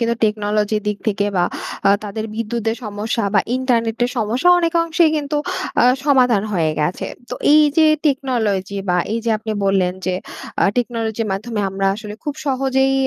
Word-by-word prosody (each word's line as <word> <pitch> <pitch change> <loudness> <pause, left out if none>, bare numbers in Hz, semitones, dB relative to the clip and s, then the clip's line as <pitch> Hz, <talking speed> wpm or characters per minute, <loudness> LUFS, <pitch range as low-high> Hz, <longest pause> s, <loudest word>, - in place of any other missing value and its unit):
কিন্তু 235 0 +1
টেকনোলজির 210 0 0
দিক 210 -1 -2
থেকে 205 -1 +1
বা 175 - +3 0.4
আ - - +6
তাদের 215 +2 -4
বিদ্যুতের 225 0 -2
সমস্যা 210 +2 -2
বা 200 - +6 0.2
ইন্টারনেটের 240 -2 0
সমস্যা 240 +9 +1
অনেকাংশেই 335 -1 +2
কিন্তু 295 0 -2 0.5
আ - - +5 0.2
সমাধান 250 -8 +4
হয়ে 165 -5 +1
গেছে। 160 +4 -1 0.2
তো - - -2 0.2
এই 305 0 +7
যে 315 -1 +6 0.2
টেকনোলজি 220 -8 0
বা 180 - +2 0.2
এই 230 - 0
যে 230 - +1
আপনি 220 0 -4
বললেন 190 -2 +2
যে, 185 - +1 0.5
আ - - +5
টেকনোলজির 230 -2 -1
মাধ্যমে 215 +2 -3
আমরা 195 0 -1
আসলে 210 -1 -7
খুব 295 -1 -2
সহজেই 265 0 +1
225 Hz, 160 wpm, -19 LUFS, 205-260 Hz, 0.5 s, এই